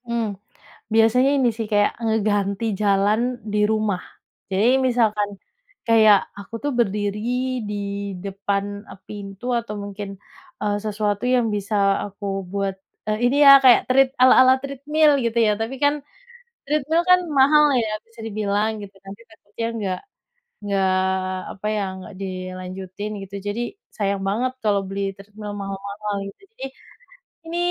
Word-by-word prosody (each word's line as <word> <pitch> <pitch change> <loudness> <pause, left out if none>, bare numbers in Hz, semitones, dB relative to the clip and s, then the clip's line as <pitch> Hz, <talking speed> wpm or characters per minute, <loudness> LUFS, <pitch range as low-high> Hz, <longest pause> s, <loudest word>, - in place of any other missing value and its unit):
Hmm, 235 -1 -1 0.7
biasanya 225 +4 +4
ini 255 -3 +3
sih, 225 - -2
kayak 205 0 +3
ngeganti 205 -2 0 0.2
jalan 205 +2 +3 0.3
di 210 - +1
rumah. 215 -4 0 0.5
Jadi 195 +4 +2 0.2
misalkan 215 -4 +1 0.6
kayak 220 -2 +7 0.2
aku 200 +3 -9
tuh 290 - 0
berdiri 205 -2 0 0.5
di 210 - -3 0.5
depan 200 0 -2 0.4
pintu 200 +1 -8
atau 210 -2 -7
mungkin, 200 0 -6 0.5
eee, 205 -1 0
sesuatu 210 0 -1
yang 240 -2 +2
bisa 205 +1 -3 0.3
aku 200 0 -9 0.3
buat, 195 -1 -1 0.3
eee, 215 0 0
ini 245 +3 +2
ya 275 - +11
kaya 250 -2 +8
tread 265 +1 +4
ala-ala 255 0 +7
treadmill 295 +3 +2
gitu 230 0 -1
ya, - - +4
tapi 230 +4 -3
kan 285 0 +5 0.7
treadmill 305 +3 +1
kan 365 0 +7 0.2
mahal 300 +3 +6 0.2
ya, 220 - -2 0.2
bisa 230 0 -26
dibilang 210 0 0
gitu 200 0 -10
kan. 195 - -11
Nanti 220 - -19
takutnya 220 +1 -7
nggak 190 -3 -2 0.6
nggak 195 -2 +1 0.7
apa 200 - -7
ya, 210 - 0 0.2
nggak 185 +2 -11
dilanjutin 185 +1 -6
gitu, 195 0 -10
jadi 215 +4 -2 0.3
sayang 200 -2 -1
banget 245 +6 0
kalau 205 -2 +3
beli 195 +1 -4 0.2
treadmill 205 +1 -9
mahal-mahal 200 +1 -5
gitu, 195 - -14 0.2
jadi 270 - -5 0.8
ini 340 - -3
210 Hz, 140 wpm, -22 LUFS, 200-235 Hz, 0.8 s, ya